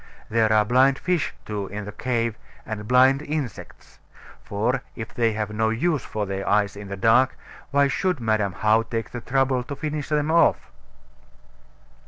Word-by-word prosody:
There 110 Hz, -1 st, +3 dB
are 105 Hz, -1 st, +4 dB
blind 130 Hz, +4 st, +4 dB
fish, 180 Hz, -4 st, -1 dB
too, 105 Hz, -2 st, -4 dB
in 105 Hz, +1 st, -6 dB
the 105 Hz, -, -6 dB
cave, 115 Hz, 0 st, -1 dB, 0.3 s
and 105 Hz, -2 st, -6 dB
blind 130 Hz, +3 st, +5 dB
insects; 150 Hz, -6 st, -6 dB, 0.4 s
for, 120 Hz, +6 st, -1 dB
if 110 Hz, -2 st, -7 dB
they 115 Hz, -2 st, +1 dB
have 105 Hz, -1 st, -3 dB
no 110 Hz, +1 st, +1 dB
use 145 Hz, +6 st, 0 dB
for 105 Hz, -1 st, -3 dB
their 95 Hz, 0 st, -3 dB
eyes 100 Hz, -1 st, +2 dB
in 100 Hz, 0 st, -8 dB
the 100 Hz, 0 st, -6 dB
dark, 120 Hz, +5 st, +3 dB, 0.3 s
why 140 Hz, 0 st, +3 dB
should 180 Hz, +2 st, -1 dB
Madam 110 Hz, -4 st, 0 dB
How 110 Hz, +3 st, +3 dB
take 115 Hz, 0 st, -4 dB
the 120 Hz, -, -6 dB
trouble 130 Hz, +1 st, +1 dB
to 135 Hz, +3 st, -6 dB
finish 150 Hz, 0 st, -4 dB
them 150 Hz, 0 st, +1 dB
off? 170 Hz, -, +3 dB
115 Hz, 170 wpm, -24 LUFS, 105-135 Hz, 0.4 s, blind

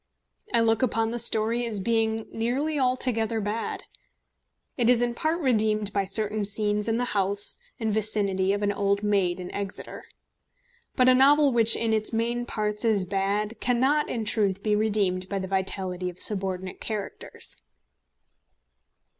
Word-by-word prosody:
I 230 Hz, -, +3 dB
look 225 Hz, -1 st, +2 dB
upon 225 Hz, -3 st, 0 dB
the 240 Hz, -, -2 dB
story 230 Hz, +1 st, +2 dB
as 215 Hz, -3 st, -1 dB
being 225 Hz, +1 st, 0 dB
nearly 275 Hz, +7 st, -1 dB
altogether 250 Hz, -3 st, 0 dB
bad. 210 Hz, +2 st, -4 dB, 0.9 s
It 240 Hz, -2 st, +1 dB
is 245 Hz, -1 st, +4 dB
in 240 Hz, 0 st, -1 dB
part 315 Hz, +7 st, -1 dB
redeemed 215 Hz, -6 st, +1 dB
by 200 Hz, -1 st, 0 dB
certain 215 Hz, +2 st, -1 dB
scenes 210 Hz, +1 st, 0 dB
in 225 Hz, 0 st, 0 dB
the 245 Hz, -, 0 dB
house 200 Hz, 0 st, +3 dB, 0.2 s
and 220 Hz, -2 st, -1 dB
vicinity 200 Hz, -3 st, +1 dB
of 205 Hz, +1 st, -1 dB
an 205 Hz, -, +1 dB
old 200 Hz, 0 st, 0 dB
maid 195 Hz, -4 st, +1 dB
in 180 Hz, 0 st, -7 dB
Exeter. 200 Hz, -1 st, -6 dB, 0.9 s
But 255 Hz, -1 st, +3 dB
a 255 Hz, -, +7 dB
novel 280 Hz, +2 st, +5 dB
which 230 Hz, -1 st, +5 dB
in 225 Hz, -1 st, 0 dB
its 215 Hz, -1 st, 0 dB
main 235 Hz, +2 st, -1 dB
parts 210 Hz, 0 st, -1 dB
is 215 Hz, -5 st, +2 dB
bad 200 Hz, +3 st, -2 dB
cannot, 265 Hz, +5 st, +1 dB
in 225 Hz, -3 st, -3 dB
truth, 200 Hz, -3 st, 0 dB
be 210 Hz, -1 st, +1 dB
redeemed 200 Hz, -4 st, 0 dB
by 200 Hz, -, -2 dB
the 190 Hz, -1 st, -4 dB
vitality 190 Hz, -1 st, -3 dB
of 180 Hz, -, -12 dB
subordinate 190 Hz, -2 st, -2 dB
characters. 215 Hz, -3 st, -5 dB
215 Hz, 155 wpm, -26 LUFS, 200-230 Hz, 0.9 s, a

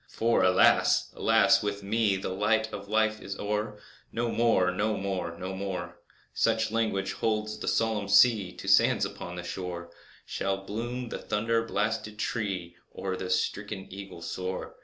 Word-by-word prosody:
For, 115 Hz, +1 st, +1 dB
alas! 95 Hz, 0 st, +4 dB
alas! -, -, +4 dB
with 100 Hz, -1 st, -3 dB
me 105 Hz, 0 st, +2 dB
The 95 Hz, -, -3 dB
light 110 Hz, +3 st, +1 dB
of 100 Hz, 0 st, -6 dB
Life 110 Hz, 0 st, +1 dB
is 100 Hz, 0 st, -6 dB
o'er! 105 Hz, +1 st, -2 dB, 0.3 s
No 115 Hz, 0 st, -1 dB
more—no 105 Hz, -2 st, +2 dB
more—no 95 Hz, -1 st, -3 dB
more— 95 Hz, -3 st, -4 dB, 0.4 s
(Such 110 Hz, -1 st, +1 dB
language 105 Hz, -4 st, 0 dB
holds 110 Hz, -1 st, -1 dB
the -, -, -6 dB
solemn 110 Hz, -3 st, +1 dB
sea 100 Hz, -2 st, +5 dB
To -, -, -11 dB
the -, -, -8 dB
sands -, -, +4 dB
upon 90 Hz, -, -7 dB
the 90 Hz, -, -6 dB
shore) 90 Hz, -1 st, -5 dB, 0.3 s
Shall 95 Hz, 0 st, -1 dB
bloom 120 Hz, +4 st, -4 dB
the -, -, -5 dB
thunder 115 Hz, +2 st, 0 dB
blasted 105 Hz, 0 st, -2 dB
tree, 95 Hz, -7 st, -3 dB
Or 95 Hz, -1 st, -4 dB
the 95 Hz, 0 st, -5 dB
stricken 95 Hz, +2 st, -1 dB
eagle 95 Hz, -3 st, -9 dB
soar! 95 Hz, +1 st, -4 dB
100 Hz, 155 wpm, -28 LUFS, 95-110 Hz, 0.4 s, sea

